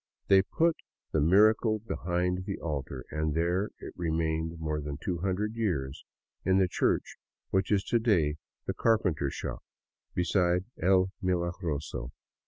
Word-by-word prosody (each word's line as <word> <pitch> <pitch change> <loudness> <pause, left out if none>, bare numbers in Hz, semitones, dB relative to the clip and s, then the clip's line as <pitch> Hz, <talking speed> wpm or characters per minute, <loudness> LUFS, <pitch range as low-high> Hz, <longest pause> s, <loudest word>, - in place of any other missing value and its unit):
They 95 -1 +7
put 165 - +1 0.3
the 80 - +2
miracle 110 +6 +5
behind 90 -3 -2
the 100 - -3
altar, 70 -5 -4
and 75 -1 -1
there 90 +5 +1
it - - -9
remained 80 -1 -1
more 75 -1 -2
than 70 -1 -5
two 90 -3 -3
hundred 100 +4 -1
years, 75 -12 -2 0.4
in 95 0 +3
the 95 -1 +4
church - - 0 0.3
which 95 +1 +1
is 100 -2 +3
to 120 - +1
day 85 -10 +2 0.3
the - - -1
carpenter 90 -11 +2
shop - - -5 0.5
beside 90 0 +2 0.2
El 95 +1 +4
Milagroso. 85 -7 -2
90 Hz, 140 wpm, -29 LUFS, 80-95 Hz, 0.5 s, They